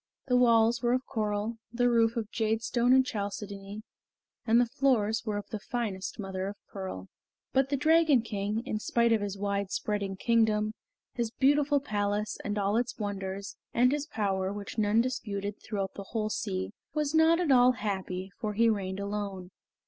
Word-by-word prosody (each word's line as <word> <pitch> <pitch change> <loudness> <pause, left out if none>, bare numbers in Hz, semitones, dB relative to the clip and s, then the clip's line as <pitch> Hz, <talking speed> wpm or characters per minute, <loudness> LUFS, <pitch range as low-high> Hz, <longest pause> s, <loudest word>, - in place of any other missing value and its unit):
The 250 - +1
walls 235 -1 +4
were 240 0 +2
of 255 +1 0
coral, 215 0 -2
the 245 +1 +2
roof 230 -1 +3
of 220 -2 -3
jadestone 225 +2 +1
and 260 0 +6
chalcedony, 205 -1 -5 0.6
and 230 +2 +5
the 245 - +4
floors 235 -5 +1
were 210 -1 -1
of 205 - -5
the 215 - -3
finest 210 -5 -3
mother 190 -2 -4
of 200 - -5 0.2
pearl. 185 - -6 0.5
But 270 0 +3
the 280 - +1
Dragon 310 -4 +4
King, 210 0 -2
in 215 -5 -2
spite 235 +1 +2
of 220 - +2
his 200 -1 -3
wide 200 -1 -1
spreading 200 -2 -2
kingdom, 215 0 +2 0.4
his 235 -2 -1
beautiful 285 +3 +3
palace 210 -4 -2
and 205 0 -2
all 205 +1 +1
its 240 0 -1
wonders, 200 -1 -4 0.2
and 250 +2 +5
his 295 +1 -1
power, 195 -6 -1
which 205 +2 -6
none 215 +2 +4
disputed 205 -5 -3
throughout 195 -3 -3
the 200 - -8
whole 215 -2 -1
sea, 95 - -2 0.2
was 300 -1 0
not 320 +1 +5
at 340 -5 +1
all 250 -1 +6
happy, 190 -5 -4
for 215 -1 -2
he 230 +2 +4
reigned 195 -2 -3
alone. 200 -2 -4
215 Hz, 175 wpm, -29 LUFS, 200-245 Hz, 0.6 s, and